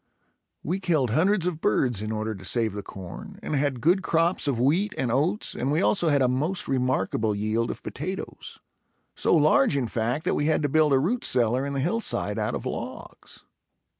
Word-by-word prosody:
We 180 +5 -2
killed 155 - +1
hundreds 180 - +2
of 170 -3 -2
birds 125 -6 +1
in 110 0 -3
order 110 0 -2
to 95 -2 -11
save 110 +1 0
the 105 - -4
corn 95 -3 -9
and - - -4
had 140 -2 0
good 180 - +3
crops 165 -2 +1
of 130 -5 0
wheat 170 - +1
and 125 -3 -1
oats 160 - 0
and 135 +3 -2
we 155 - +2
also 180 -3 +3
had 140 -2 +3
a - - +4
most 150 +9 -1
remarkable 125 -5 0
yield 110 +3 -1
of - - -6
potatoes; 185 +8 -6 0.5
so - - +2
large 145 -2 +4
in 125 -4 0
fact, 120 +7 -2
that - - +1
we 145 - 0
had 155 -1 +1
to 145 - +1
build 155 +1 +3
a 135 - +5
root 205 - 0
cellar 125 +2 +1
in 140 - -4
the 140 - -1
hillside 180 +11 0
out - - -1
of - - -6
logs. - - -7
140 Hz, 200 wpm, -25 LUFS, 120-165 Hz, 0.5 s, a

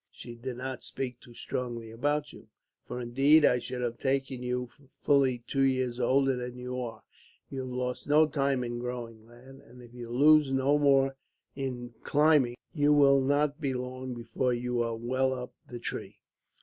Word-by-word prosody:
"She 120 - -10
did 120 +1 -6
not 130 0 -5
speak 125 -2 -5
too 120 -3 -16
strongly 120 -3 -5
about 145 +5 -1
you, - - -14 0.4
for 125 - -5
indeed 135 +6 +4
I 125 - +4
should 125 +1 -5
have 120 -1 -3
taken 135 -1 -1
you 125 0 -2
for 130 +2 -23
fully 130 -4 +2
two 135 - -1
years 130 -2 +1
older 135 +2 +3
than 125 0 -6
you 125 0 -4
are. 115 -2 -7 0.5
You 135 - -4
have 130 -1 -4
lost 125 +2 -3
no 155 +2 +6
time 140 -4 0
in 120 0 -4
growing, 120 -2 -6
lad, 130 +3 -15
and 125 - -16
if 120 0 -15
you 120 -1 -8
lose 145 +3 +5
no 135 +2 +2
more 135 -1 +3 0.4
in 125 -3 -5
climbing, 145 -5 +3 0.2
you 145 -2 +3
will 140 -2 +5
not 145 +2 +1
be 135 -3 -1
long 125 0 -5
before 120 +2 -1
you 125 0 -1
are 115 -1 -1
well 130 +3 0
up 125 -1 -7
the 120 - -7
tree. 120 - -6
130 Hz, 185 wpm, -29 LUFS, 120-135 Hz, 0.5 s, no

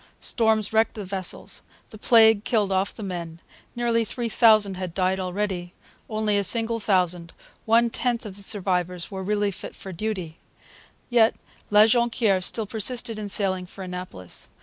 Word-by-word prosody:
Storms 220 -3 +1
wrecked 220 +1 +2
the 210 - -5
vessels. 190 -1 -2 0.3
The 215 - -11
plague 220 -3 +5
killed 215 -5 0
off 190 +1 +1
the 220 - -9
men: 170 -4 -6 0.4
nearly 235 -1 +1
three 235 +2 -4
thousand 215 -4 +4
had 180 -2 -5
died 185 0 +1
already. 185 -1 -3 0.3
Only 215 -2 +1
a - - 0
single 230 +3 +2
thousand, 180 -4 0 0.3
one 230 +1 +4
tenth 240 -1 -1
of 200 -3 -8
the 200 - -5
survivors, 180 -3 -1
were 190 -1 -5
really 205 +1 0
fit 190 - -9
for 190 - -9
duty. 185 -3 -4 0.7
Yet 230 -2 +4 0.3
La 210 +1 +7
Jonquiere 225 -4 +2
still 220 +4 -1
persisted 225 +1 -1
in 205 -1 -5
sailing 190 -2 +1
for 190 +1 -10
Annapolis. 180 - -7
205 Hz, 160 wpm, -24 LUFS, 185-220 Hz, 0.7 s, La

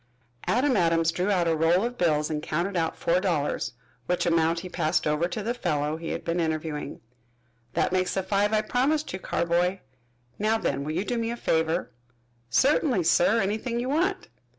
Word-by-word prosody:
Adam 255 +2 +2
Adams 165 -3 +3
drew 180 +4 -1
out 180 -4 +2
a 165 - +2
roll 165 +4 +3
of 245 +1 -3
bills 155 -6 +1
and 150 -1 -2
counted 170 +6 -2
out 165 -2 -1
four 170 +2 +2
dollars, 160 -10 -1 0.3
which 180 - 0
amount 165 0 +2
he 185 - -7
passed 155 -3 0
over 150 +3 +1
to 205 +4 -4
the 235 +3 -1
fellow 155 -9 -1
he 165 +1 -6
had - - -4
been 170 +1 -1
interviewing. 155 -3 -3 0.7
"That - - +1
makes 185 -1 0
the 190 - 0
five 200 +2 +1
I 215 -1 +3
promised 280 +7 0
you, 190 - -4
Carboy. 175 +2 0 0.6
Now 215 +2 +2
then, 140 -9 -1
will 155 +2 -3
you 180 +5 -1
do 240 +1 -1
me 230 0 -1
a 235 - -3
favor?" 160 -5 0 0.6
"Certainly, 260 - +3
sir, 175 +7 +4
anything 220 +4 -1
you 250 +2 -2
want." 360 +7 0
180 Hz, 190 wpm, -26 LUFS, 160-220 Hz, 0.7 s, sir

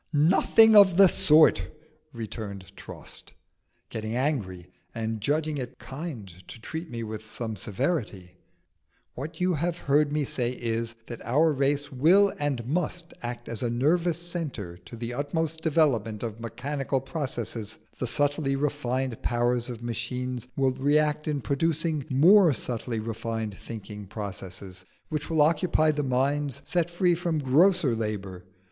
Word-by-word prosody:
"Nothing 190 +8 +6
of 195 -4 +8
the 195 -1 +9
sort!" 155 -2 +5 0.4
returned 100 -5 -7
Trost, - - -8 0.6
getting 110 +1 -4
angry, 100 - -2 0.2
and 110 -1 -3
judging 150 +4 0
it 125 -2 -6
kind 135 - -7 0.2
to 115 - -10
treat 160 +8 -6
me 115 -1 -5
with 110 -1 -6
some 110 0 -5
severity; 100 - -3 0.8
"what 145 +8 -7
you 180 0 +2
have 170 +2 -1
heard 145 -1 +2
me 150 0 0
say 125 -1 -1
is, 115 -1 -3
that 120 -1 -8
our 150 +8 +3
race 140 +1 0
will 180 +10 +4
and 140 -5 -1
must 170 +4 -2
act 120 0 -5
as 115 -2 -5
a 120 - 0
nervous 160 +8 +1
centre 160 - -5
to 85 - -10
the 115 +1 -5
utmost 160 +4 -2
development 135 -10 +1
of 115 -1 -5
mechanical 135 +4 -2
processes: 120 -6 -4 0.2
the 125 - -1
subtly 145 +3 0
refined 135 -3 -2
powers 120 0 0
of 120 -1 -7
machines 125 +1 -4
will 135 -1 +3
react 150 +3 +1
in 145 -2 -1
producing 155 +1 0
more 170 +5 +6
subtly 115 -1 -4
refined 110 -1 -4
thinking 105 -2 -8
processes 95 -2 -7 0.3
which 150 -2 -3
will 160 -2 +4
occupy 155 0 +3
the 150 -1 -2
minds 140 +1 0
set 175 -1 0
free 175 +1 +2
from 170 -1 -1
grosser 150 +1 +3
labour. 100 -5 -4
135 Hz, 140 wpm, -27 LUFS, 115-155 Hz, 0.8 s, the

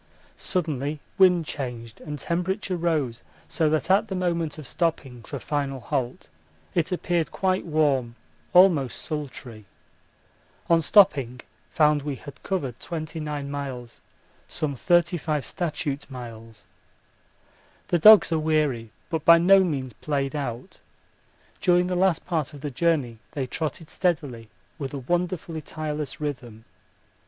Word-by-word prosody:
Suddenly 150 -4 -2 0.2
wind 180 -3 +5
changed 120 -6 -6
and 150 -1 -6
temperature 185 +4 -2
rose 155 -9 -1 0.3
so 160 -2 +1
that 155 +3 +1
at 200 +3 +4
the 190 - -4
moment 170 -4 -1
of 155 - -8
stopping 135 -6 -2
for - - -6
final 140 -2 -2
halt 130 -1 -3 0.5
it 170 +1 0
appeared 175 -2 0
quite 185 -2 0
warm, 140 -7 +1 0.4
almost 175 -9 +5
sultry. 130 -7 -6 1.1
On 165 0 +5
stopping 140 - +4 0.3
found 150 -1 +3
we 145 -1 -3
had 145 +2 -12
covered 135 - -3
29 155 -3 -5
miles, 130 -4 -6 0.5
some 145 -3 -3
35 170 -1 +1
statute 150 -6 -3
miles. 115 -4 -10 1.2
The 175 - +2
dogs 210 +2 +8
are 160 - +2
weary 150 -7 0 0.2
but 160 -3 -1
by 170 +1 +8
no 190 +3 +6
means 135 -8 -2
played 140 +3 -2
out 130 +2 -5 0.8
during 180 -1 +4
the 180 0 -1
last 180 -2 +2
part 160 -5 -2
of 140 - -11
the 145 -1 -4
journey 135 -6 0
they 140 -4 -2
trotted 155 +4 -4
steadily 145 - -1 0.3
with 140 -1 -4
a - - -3
wonderfully 170 +3 -2
tireless 150 -2 -5
rhythm. 125 -7 -5
150 Hz, 130 wpm, -25 LUFS, 135-170 Hz, 1.2 s, dogs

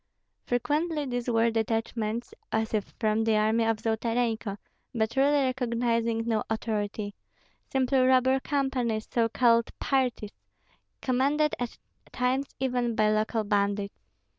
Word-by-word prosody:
Frequently 295 +5 0
these 245 -1 -3
were 230 0 +3
detachments 225 - -2 0.2
as 220 0 -1
if 210 -2 +1
from 220 0 +1
the 220 -1 +2
army 220 +2 +2
of 225 -1 +1
Zolotarenko, 225 -1 -1 0.4
but 220 0 0
really 280 +1 +4
recognizing 235 -3 0
no 220 -2 +1
authority, 210 -2 -2 0.6
simply 265 0 +2
robber 260 +1 +4
companies, 260 -6 -1
so 230 -1 +2
called 230 -1 +3
"parties" 250 -6 0 0.7
commanded 280 +4 +2
at 245 -1 -4 0.3
times 260 +2 0
even 245 -3 0
by 215 -1 +3
local 215 +1 0
bandits. 200 -1 0
230 Hz, 120 wpm, -28 LUFS, 220-255 Hz, 0.7 s, really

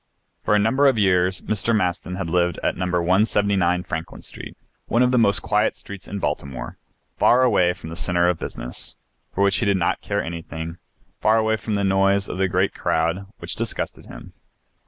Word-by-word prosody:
For 105 - +2
a - - +5
number 120 +7 +3
of 130 -4 +3
years 95 -2 +2
Mr. 110 +3 0
Maston 90 -2 -1
had 90 -2 -3
lived 85 0 +1
at - - +1
No. 90 - -2
179 90 0 +2
Franklin 80 -1 -6
Street, - - -9 0.3
one 120 +2 +3
of 125 - +3
the 125 - +3
most 100 -3 +3
quiet 105 +1 +1
streets 100 -1 -10
of 100 - -5
Baltimore, 70 -6 -4 0.4
far 125 +2 +5
away 100 -8 +3
from 90 -3 -10
the - - -6
centre 85 0 +1
of 90 -2 +1
business, - - -6 0.3
for 100 - 0
which 100 -1 +3
he - - 0
did 100 -1 +3
not 90 - 0
care 100 0 -2
anything, 80 0 -6 0.4
far 110 +1 +3
away 110 0 +2
from 110 -1 -3
the 100 - 0
noise 95 0 +2
of 90 - -5
the 95 - +3
great 95 +1 +1
crowd, 85 +5 -1
which - - -6
disgusted - - -4
him. - - -11
95 Hz, 195 wpm, -22 LUFS, 90-105 Hz, 0.4 s, a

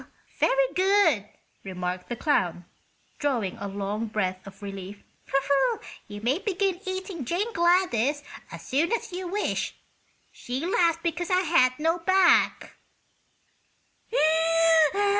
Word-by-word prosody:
"Very - - +2
good," 375 - +3 0.3
remarked 180 -1 -5
the 240 - -2
clown, 180 - 0 0.5
drawing 245 -10 -1
a 200 - -5
long 200 +3 -3
breath 190 -3 -3
of 195 +1 -13
relief. 195 0 -8 1.0
"you 205 -1 -8
may 255 +9 +1
begin 390 -3 -1
eating 375 -4 -4
Jane 390 - -2
Gladys 340 - +2 0.3
as - - -9
soon 300 +6 +1
as 465 - -2
you 365 0 -5
wish. 410 +4 -2 0.6
She 260 +5 -5
laughed 335 -2 +1
because 340 +1 -2
I 365 0 +3
had 280 -8 +3
no 325 +3 0
back." 375 +1 +3
300 Hz, 115 wpm, -26 LUFS, -, 1.0 s, good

